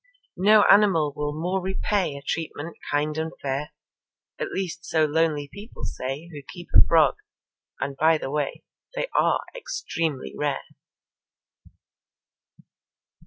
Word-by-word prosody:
No 210 Hz, +3 st, +6 dB
animal 180 Hz, -8 st, +5 dB
will 150 Hz, 0 st, -2 dB
more 175 Hz, +5 st, -1 dB
repay 190 Hz, -4 st, 0 dB
A 140 Hz, -, -10 dB
treatment 160 Hz, +1 st, -4 dB
kind 150 Hz, +1 st, 0 dB
and 160 Hz, 0 st, -2 dB
fair; 140 Hz, +2 st, -2 dB, 0.7 s
At -, -, -2 dB
least 175 Hz, -3 st, -3 dB
so 160 Hz, -1 st, +2 dB
lonely 150 Hz, -1 st, +1 dB
people 205 Hz, +4 st, -10 dB
say 135 Hz, +6 st, -4 dB
Who 145 Hz, -2 st, -8 dB
keep 175 Hz, -2 st, -10 dB
a -, -, +9 dB
frog 160 Hz, -4 st, +5 dB, 0.6 s
(and, 140 Hz, 0 st, -3 dB
by 160 Hz, +3 st, +4 dB
the 135 Hz, -, -5 dB
way, 145 Hz, -1 st, -2 dB, 0.3 s
They -, -, -2 dB
are -, -, +3 dB
extremely 165 Hz, -, -3 dB
rare). 145 Hz, -2 st, -1 dB
160 Hz, 125 wpm, -25 LUFS, 145-180 Hz, 0.7 s, a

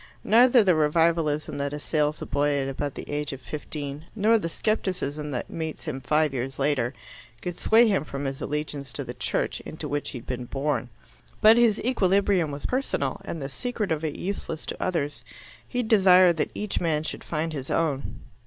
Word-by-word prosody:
Neither 240 Hz, +1 st, +6 dB
the 185 Hz, -3 st, +4 dB
Revivalism 155 Hz, -1 st, +1 dB
that 140 Hz, 0 st, -2 dB
assails 150 Hz, 0 st, -1 dB
a -, -, -5 dB
boy 145 Hz, 0 st, +1 dB
at 135 Hz, -1 st, -1 dB
about 140 Hz, +1 st, -3 dB
the -, -, -7 dB
age 145 Hz, -1 st, -3 dB
of 135 Hz, -, -7 dB
fifteen, 145 Hz, +1 st, -6 dB
nor 220 Hz, +2 st, +4 dB
the 165 Hz, -, -3 dB
scepticism 165 Hz, -8 st, -2 dB
that 130 Hz, -4 st, -3 dB
meets 160 Hz, -1 st, -5 dB
him 140 Hz, -4 st, -4 dB
five 150 Hz, +1 st, +2 dB
years 135 Hz, +1 st, -3 dB
later, 135 Hz, -3 st, 0 dB, 0.5 s
could 175 Hz, -1 st, -4 dB
sway 230 Hz, +2 st, +5 dB
him 195 Hz, -6 st, +2 dB
from 140 Hz, -2 st, -5 dB
his 135 Hz, 0 st, -4 dB
allegiance 150 Hz, -3 st, -3 dB
to -, -, -3 dB
the -, -, -6 dB
church -, -, -2 dB
into -, -, -6 dB
which 145 Hz, 0 st, -2 dB
he -, -, -6 dB
had 120 Hz, -, -10 dB
been 125 Hz, -1 st, -4 dB
born. 135 Hz, -2 st, -2 dB, 0.5 s
But 220 Hz, +1 st, +7 dB
his 230 Hz, -3 st, +4 dB
equilibrium 195 Hz, -7 st, +2 dB
was 140 Hz, 0 st, -6 dB
personal, 250 Hz, -, -1 dB
and 165 Hz, -, -4 dB
the -, -, -2 dB
secret 215 Hz, -, -3 dB
of 160 Hz, 0 st, 0 dB
it 155 Hz, -2 st, -2 dB
useless 180 Hz, -4 st, -4 dB
to -, -, -4 dB
others. 150 Hz, -6 st, -2 dB, 0.4 s
He 245 Hz, -1 st, -1 dB
desired 185 Hz, -5 st, +6 dB
that -, -, 0 dB
each 210 Hz, -1 st, -2 dB
man 155 Hz, -3 st, +1 dB
should -, -, -5 dB
find 160 Hz, 0 st, -2 dB
his 135 Hz, -3 st, -5 dB
own. 150 Hz, -5 st, -1 dB
155 Hz, 190 wpm, -26 LUFS, 140-185 Hz, 0.5 s, But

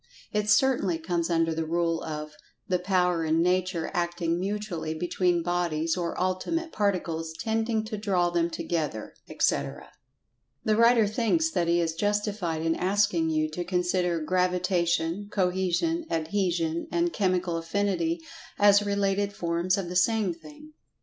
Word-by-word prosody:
It 210 Hz, 0 st, 0 dB
certainly 215 Hz, -6 st, +3 dB
comes 170 Hz, +1 st, -2 dB
under 165 Hz, -1 st, +2 dB
the 160 Hz, 0 st, -3 dB
rule 165 Hz, 0 st, 0 dB
of 150 Hz, -1 st, -5 dB, 0.4 s
"the 180 Hz, -1 st, +1 dB
power 180 Hz, -2 st, +1 dB
in 160 Hz, +1 st, +2 dB
nature 180 Hz, -1 st, 0 dB
acting[Pg 175 Hz, -1 st, -1 dB
148] 170 Hz, -, +1 dB
mutually 185 Hz, -5 st, -3 dB
between 175 Hz, +1 st, 0 dB
bodies, 165 Hz, -2 st, 0 dB
or 170 Hz, -2 st, -3 dB
ultimate 185 Hz, -, -1 dB
particles, 170 Hz, -6 st, -1 dB
tending 225 Hz, 0 st, 0 dB
to 215 Hz, -1 st, -5 dB
draw 185 Hz, -4 st, +1 dB
them 170 Hz, -1 st, +1 dB
together," 160 Hz, -9 st, -3 dB, 0.2 s
etc. 70 Hz, -1 st, -1 dB, 0.7 s
The 215 Hz, -, +2 dB
writer 230 Hz, 0 st, +5 dB
thinks 245 Hz, +10 st, +1 dB
that 175 Hz, -, 0 dB
he 170 Hz, +1 st, +3 dB
is 165 Hz, -1 st, 0 dB
justified 205 Hz, -3 st, -1 dB
in 165 Hz, 0 st, +2 dB
asking 185 Hz, -3 st, +1 dB
you 155 Hz, -1 st, +1 dB
to 175 Hz, +3 st, -3 dB
consider 180 Hz, -1 st, 0 dB
Gravitation, 180 Hz, +1 st, 0 dB
Cohesion, 190 Hz, -, 0 dB
Adhesion 165 Hz, -1 st, -1 dB
and 345 Hz, 0 st, +1 dB
Chemical 185 Hz, -3 st, 0 dB
Affinity 170 Hz, -1 st, -1 dB, 0.4 s
as 205 Hz, 0 st, +6 dB
related 200 Hz, 0 st, 0 dB
forms 170 Hz, +1 st, 0 dB
of 195 Hz, -3 st, -3 dB
the 180 Hz, -, -6 dB
same 205 Hz, 0 st, +2 dB
thing. 165 Hz, -, -14 dB
180 Hz, 145 wpm, -27 LUFS, 165-205 Hz, 0.7 s, as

